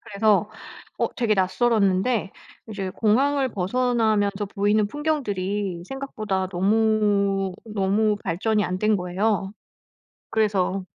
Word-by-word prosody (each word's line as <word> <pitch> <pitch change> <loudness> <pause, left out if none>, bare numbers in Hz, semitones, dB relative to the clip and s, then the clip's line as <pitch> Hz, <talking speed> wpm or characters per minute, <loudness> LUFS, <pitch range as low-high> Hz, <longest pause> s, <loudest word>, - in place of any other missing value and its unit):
그래서 205 0 +1 0.5
어 - - 0
되게 230 -4 +1
낯설었는데 200 +1 +1 0.4
이제 195 -3 -4
공항을 265 +7 +1
벗어나면서 210 -1 0
보이는 205 +1 +2
풍경들이 205 - -2
생각보다 215 -8 -3
너무, 200 0 +1
너무 210 0 +1
발전이 210 +5 0
안 185 +1 -2
된 215 +1 +2
거예요. 195 +2 -1 0.8
그래서 195 -3 +1
205 Hz, 255 characters per minute, -24 LUFS, 195-220 Hz, 0.8 s, 보이는